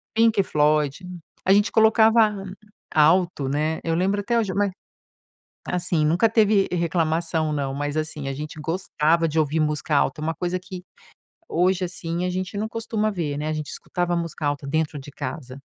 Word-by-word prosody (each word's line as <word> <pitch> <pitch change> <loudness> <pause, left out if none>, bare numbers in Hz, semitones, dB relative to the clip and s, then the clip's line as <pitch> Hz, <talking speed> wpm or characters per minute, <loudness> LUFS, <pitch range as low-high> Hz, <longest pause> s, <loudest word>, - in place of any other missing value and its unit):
Pink 225 -2 +4
Floyd. 150 +1 +1 0.4
A 190 - +2
gente 205 +2 +4
colocava 220 0 +5 0.6
alto, 160 -3 +3
né. 155 +3 -1
Eu 165 -1 0
lembro 195 +4 +1
até 235 +3 +1
hoje 205 -5 -1
mas 200 0 +1 1.0
assim, 180 -3 0
nunca 170 +9 +3
teve, 210 -3 +3
eh, - - 0
reclamação 165 -2 0
não, 140 -2 -2
mas, 145 +1 -3
assim 155 -2 -3
a 135 - -2
gente 150 +2 -7
gostava 165 0 +1
de 160 +1 -3
ouvir 155 +1 +1
música 150 0 0
alta, 140 +1 +1
é - - -4
uma 165 +1 -1
coisa 180 +3 -2
que 185 0 -9 0.7
hoje, 185 +2 +1
assim, 175 0 -4
a 180 - 0
gente 185 +2 -4
não 215 +1 -2
costuma 225 -1 -2
ver, 165 -8 -3
né, 150 - -3
a - - -1
gente 155 -1 -4
escutava 175 -1 -2
música 165 -2 -4
alta 145 -1 -2
dentro 155 +1 -1
de 140 +1 -10
casa. 135 -2 -6
165 Hz, 180 wpm, -23 LUFS, 150-190 Hz, 1.0 s, colocava